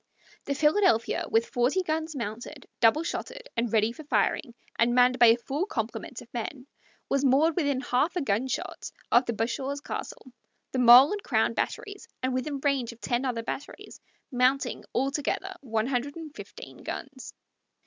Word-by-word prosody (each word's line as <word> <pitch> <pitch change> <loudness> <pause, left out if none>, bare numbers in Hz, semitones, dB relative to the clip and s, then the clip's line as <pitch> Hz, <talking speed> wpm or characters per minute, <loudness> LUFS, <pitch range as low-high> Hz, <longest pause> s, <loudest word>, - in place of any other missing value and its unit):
The 280 - -1
Philadelphia, 300 - +2
with 225 +1 +3
forty 255 +10 +1
guns 315 -1 -2
mounted, 235 +4 -6
double 245 +8 +4
shotted, - - -5
and 230 -1 -1
ready 220 0 +3
for 310 - -10
firing, 275 -3 0 0.2
and 240 +1 +3
manned 250 0 +4
by 240 - +8
a 230 +1 +6
full 285 - -3
complement 230 - -4
of 235 - -23
men, 250 +2 -5 0.4
was 275 0 0
moored 285 +4 +4
within 285 -6 0
half 265 +7 0
a 355 - 0
gunshot 245 +3 -2 0.2
of 245 +1 +4
the 235 - 0
Bashaw's 265 +5 -2
castle, 390 - -7 0.4
the 260 - -1
mole 250 +3 +9
and 415 0 -2
crown 225 - +1
batteries, 405 - -4 0.2
and 260 0 0
within 275 +2 -2
range 270 -5 0
of 235 - -15
ten 245 +2 -1
other 235 -3 -2
batteries, 280 +5 -7 0.3
mounting, 255 +1 +1
altogether, 285 +8 -1
one 225 -5 -1
hundred 265 +2 -2
and 320 -3 -8
fifteen - - -10
guns. 270 -2 -7
260 Hz, 165 wpm, -27 LUFS, 240-295 Hz, 0.4 s, mole